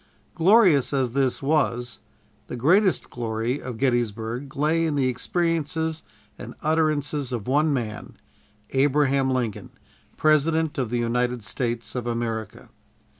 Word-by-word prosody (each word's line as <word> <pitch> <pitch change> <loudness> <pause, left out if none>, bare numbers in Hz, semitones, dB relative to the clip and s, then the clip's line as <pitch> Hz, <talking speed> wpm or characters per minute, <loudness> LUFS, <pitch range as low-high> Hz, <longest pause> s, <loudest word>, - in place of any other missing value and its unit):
Glorious 175 - +4
as 130 -3 +1
this 135 0 0
was, 130 -5 0 0.5
the - - -6
greatest 180 - +2
glory 115 +3 -2
of 125 -3 -6
Gettysburg 120 +1 -1
lay 155 +3 +1
in 160 -3 0
the 135 -2 +2
experiences 160 +3 -1 0.4
and - - -8
utterances 150 -3 0
of 120 -4 -4
one 150 +4 +2
man, 115 -6 -4 0.5
Abraham 135 0 +2
Lincoln, 125 -5 -2 0.5
President 155 0 +2
of 125 -4 -1
the 120 - -1
United 120 0 -1
States 115 0 -3
of 125 -2 -4
America. 115 -2 -4
135 Hz, 125 wpm, -24 LUFS, 120-155 Hz, 0.5 s, Glorious